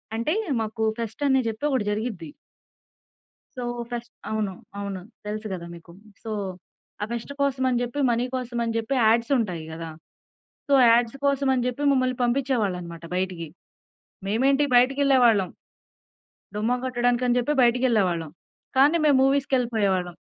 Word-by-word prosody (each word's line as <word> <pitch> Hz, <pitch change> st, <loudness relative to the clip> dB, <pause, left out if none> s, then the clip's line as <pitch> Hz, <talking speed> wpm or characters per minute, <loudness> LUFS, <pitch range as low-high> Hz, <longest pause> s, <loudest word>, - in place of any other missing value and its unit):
అంటే 230 Hz, +8 st, 0 dB, 0.3 s
మాకు 220 Hz, +1 st, -3 dB, 0.2 s
ఫెస్ట్ 230 Hz, +4 st, -5 dB
అని 265 Hz, -1 st, +4 dB
చెప్పి 220 Hz, +3 st, -5 dB
ఒకటి 260 Hz, -6 st, +1 dB
జరిగిద్ది. 205 Hz, -7 st, -4 dB, 1.3 s
సో 250 Hz, -, -3 dB, 0.3 s
ఫెస్ట్ 240 Hz, 0 st, -5 dB, 0.2 s
అవును. 215 Hz, -3 st, -1 dB, 0.3 s
అవును. 200 Hz, -2 st, -4 dB, 0.3 s
తెలుసు 215 Hz, +1 st, -4 dB
గదా 170 Hz, -2 st, -6 dB
మీకు? 170 Hz, 0 st, -14 dB, 0.3 s
సో 225 Hz, -, -5 dB, 0.7 s
ఆ -, -, 0 dB
ఫెస్ట్ 235 Hz, +3 st, -5 dB
కోసం 275 Hz, -2 st, +1 dB
అని 245 Hz, -1 st, +1 dB
చెప్పి, 245 Hz, +4 st, -4 dB
మనీ 240 Hz, +1 st, +1 dB
కోసం 245 Hz, -1 st, -4 dB
అని 230 Hz, -1 st, -2 dB
చెప్పి, 230 Hz, +4 st, -2 dB
యాడ్స్ 230 Hz, +3 st, +3 dB
ఉంటాయి 180 Hz, -9 st, -2 dB
గదా! 165 Hz, 0 st, -6 dB, 0.8 s
సో -, -, 0 dB, 0.2 s
యాడ్స్ 235 Hz, +2 st, +3 dB
కోసమని 270 Hz, -3 st, +2 dB
చెప్పి 250 Hz, +3 st, -3 dB
మమ్మల్ని 255 Hz, -2 st, +1 dB
పంపించేవాళ్ళు 240 Hz, -6 st, +1 dB
అన్నమాట 170 Hz, -1 st, -9 dB
బయటికి. 180 Hz, -2 st, -2 dB, 0.8 s
మేమేంటి 270 Hz, +7 st, +2 dB
బయటకేళ్ళేవాళ్ళం. 250 Hz, -6 st, +4 dB, 1.1 s
డుమ్మా 220 Hz, +4 st, 0 dB
కొట్టడానికి 245 Hz, -1 st, +1 dB
అని 245 Hz, 0 st, +2 dB
చెప్పి 245 Hz, +4 st, 0 dB
బయటికేళ్ళేవాళ్ళం. 220 Hz, -, +2 dB, 0.5 s
కానీ 285 Hz, +5 st, +5 dB
మేము 290 Hz, -3 st, +5 dB
మూవీస్‌కేళ్ళిపోయేవాళ్ళం. 235 Hz, -10 st, +1 dB
235 Hz, 135 wpm, -25 LUFS, 210-260 Hz, 1.3 s, కానీ